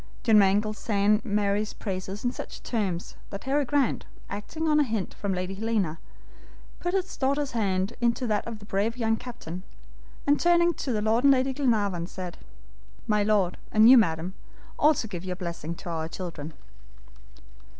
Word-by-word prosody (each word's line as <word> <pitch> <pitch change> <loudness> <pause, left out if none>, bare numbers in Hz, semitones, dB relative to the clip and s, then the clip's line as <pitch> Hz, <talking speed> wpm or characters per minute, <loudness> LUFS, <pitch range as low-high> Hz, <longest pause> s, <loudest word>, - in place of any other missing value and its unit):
John 220 -3 +6
Mangles 205 +2 +2
sang 210 0 +2
Mary's 205 -1 0
praises 195 +1 -5
in 245 - +2
such - - -8
terms, 195 -7 -2
that 200 - -7
Harry 280 +2 +1
Grant, 270 -1 +1 0.2
acting 310 +11 -4
on 300 -1 +4
a - - +5
hint 220 -7 -2
from 200 - -3
Lady 185 0 -2
Helena, 200 -6 -1 0.8
put 350 +2 -1
his 380 0 -1
daughter's 280 +1 0
hand 195 -2 0
into 240 +2 +1
that 215 -2 0
of 230 -1 -5
the 210 - -13
brave 210 +4 -1
young 225 -2 +2
captain, 220 -8 -7 0.6
and 285 +1 +3
turning 345 0 +4
to 250 -8 -2
Lord 220 +3 +2
and 280 - +7
Lady 265 0 +1
Glenarvan, 205 -10 +1
said: 180 -2 -7 0.7
"My 210 -1 +2
Lord, 205 -4 +2
and 215 +1 +6
you, - - +10
Madam, 175 -5 +2 0.5
also 295 -6 +3
give 180 -5 -6
your 185 -1 -3
blessing 170 -2 -5
to 175 - -8
our 160 -1 -2
children." 165 -3 -6
210 Hz, 165 wpm, -27 LUFS, 190-250 Hz, 0.8 s, you